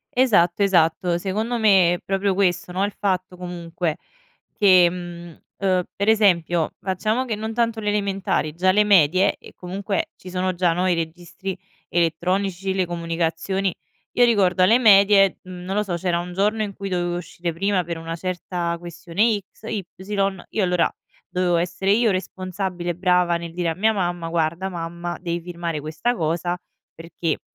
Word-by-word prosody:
Esatto, 205 -8 +3
esatto, 175 -1 +3
secondo 215 +6 -2
me, 190 -5 +5
è - - -4
proprio 195 0 0
questo, 180 -2 +1
no, 190 +2 0
il 205 - -3
fatto 185 -2 -1
comunque: 175 -2 -4 0.6
che, 185 -4 +6
mhmm, 175 -1 -8 0.2
ehm, 185 -2 +2
per 200 +2 +1
esempio, 175 -6 +3
facciamo 215 +7 -1
che 225 -4 -2
non 220 +1 -4
tanto 230 -1 0
le 210 -1 -1
elementari, 195 -6 -1
già 185 +2 +3
le 210 +2 +4
medie. 185 -1 +4
E - - -15
comunque 195 +2 -3
ci 185 - -11
sono 185 0 -1
già, 175 -2 +2
no, 180 +2 0
i 180 - +3
registri 175 +3 -5 0.3
elettronici, 180 +3 0
le 185 -2 0
comunicazioni. 170 +3 -1 0.4
Io 245 - +5
ricordo 190 -5 +3
alle 230 +6 +5
medie, 200 -3 +6
non 185 +1 -6
lo 210 - +2
so, 185 -4 -4
c'era 170 0 0
un 175 0 -6
giorno 210 +3 +1
in 200 -1 -4
cui 195 0 -6
dovevo 175 -1 -1
uscire 170 -1 -5
prima 195 +1 0
per 170 -1 -5
una 165 0 -5
certa 175 -1 -3
questione 175 +6 0
X, - - -26
Y, 200 -3 -2 0.7
io 210 - 0
allora 180 -2 +2 0.4
dovevo 180 -1 +1
essere 180 +3 0
io 225 +1 +4
responsabile 185 -2 -3
brava 180 -1 +2
nel 170 -1 -8
dire 175 -1 -1
a 160 - -2
mia 220 +3 +2
mamma: 175 -3 -2
"Guarda 170 +3 -1
mamma, 175 0 -5
devi 170 -1 -2
firmare 170 -2 -4
questa 160 +11 -1
cosa 170 +1 -1 0.4
perché, 165 -1 -3
180 Hz, 165 wpm, -22 LUFS, 170-195 Hz, 0.7 s, che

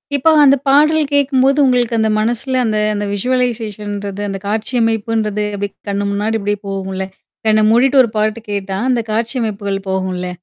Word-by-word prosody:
இப்போ 280 +4 +3
அந்த 275 0 +6
பாடல் 305 +3 +4
கேட்கும்போது 275 0 +3
உங்களுக்கு 245 -2 +1
அந்த 220 0 +2
மனசுல 240 +4 -1
அந்த, 215 -1 0 0.2
அந்த 205 0 -2
விஷூவலைசேஷன்றது, 210 -4 -2
அந்த 195 0 -4
காட்சியமைப்புன்றது 220 -1 -1
அப்பிடி 200 0 -3 0.2
கண்ணு 200 0 -1
முன்னாடி 215 +2 -1
இப்பிடியே 205 0 -2
போகும்ல. 190 -1 -4 0.4
கண்ண 215 0 +4
மூடிட்டு 265 +3 +4
ஒரு 230 - -1
பாட்டு 215 +2 0
கேட்டா, 195 -1 -3
அந்த 240 -2 +2
காட்சிமைப்புகள் 215 -4 -2
போகும்ல. 185 -1 -2
220 Hz, 145 wpm, -16 LUFS, 200-250 Hz, 0.4 s, அந்த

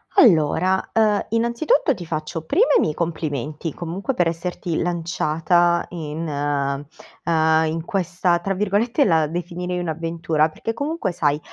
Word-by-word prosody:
Allora, 185 - +4
uhm, 215 -2 +3
innanzitutto, 235 - +2
ti 180 - -8
faccio 155 +1 -4
prima 370 - +3
i - - +4
miei 155 - +1
complimenti, 155 -2 -3
comunque, 180 +9 -4
per 175 -2 +2
esserti 170 0 -3
lanciata 170 0 +1
in 160 -1 -5
uhm, 145 +3 -1
in 160 +1 -3
questa 180 -2 0
tra 195 +3 -2
virgolette, 210 +7 +1
la 160 -5 +3
definirei 180 +2 -4
"un'avventura" 165 -1 0
perché 225 +8 -4
comunque, 285 - -2
sai, 150 -4 0
170 Hz, 130 wpm, -22 LUFS, 160-190 Hz, -, Allora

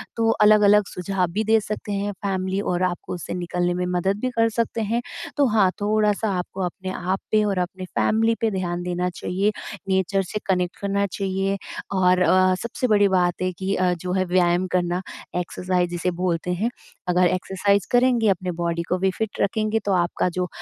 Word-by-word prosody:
तो 225 -1 +2
अलग-अलग 210 -1 +6
सुझाव 180 0 -1
भी 210 +5 0
दे 220 +1 +4
सकते 210 0 -5
हैं। 205 0 -1
फैमिली 190 0 -2
और 180 -2 -1
आपको 180 -1 -2
उस 175 - -6
से - - -3
निकलने 175 0 -1
में 180 0 -1
मदद 190 +3 +1
भी 255 - 0
कर 225 0 +4
सकते 230 0 -1
हैं। 225 +3 0 0.4
तो 285 - +4
हाँ, 210 -4 +4
थोड़ा-सा 210 +1 +1
आपको 185 +2 -5
अपने 185 +2 -5
आप 185 +1 -2
पे 215 0 +4
और 200 -2 0
अपने 185 +1 -3
फैमिली 225 +4 +1
पे 225 -1 +2
ध्यान 175 -2 -2
देना 180 0 -1
चाहिए 190 +3 -1 0.4
नेचर 190 +1 +1
से 210 - -3
कनेक्ट 180 -1 0
करना 200 0 0
चाहिए। 195 +1 -1 0.4
और 185 -1 +3
अ, 185 0 +4
सबसे 235 +2 -2
बड़ी 205 -2 +4
बात 180 -2 +1
है 185 0 0
कि 195 +1 -1
अ, 185 -1 +2
जो 180 +1 -5
है 185 0 +1
व्यायाम 180 0 +2
करना 175 0 0 0.3
एक्सरसाइज़ 180 0 -1
जिसे 175 +1 -1
बोलते 180 -1 0
हैं, 210 +7 0 0.4
अगर 180 0 +4
एक्सरसाइज़ 190 +2 0
करेंगे 245 -3 +4
अपने 185 -1 0
बॉडी 170 0 -1
को 180 - +1
भी 190 +1 +1
फिट 220 -2 -3
रखेंगे। 215 +2 +1
तो 200 - +1
आपका 175 +1 0
जो 180 +1 -2
190 Hz, 190 wpm, -23 LUFS, 180-210 Hz, 0.4 s, अलग-अलग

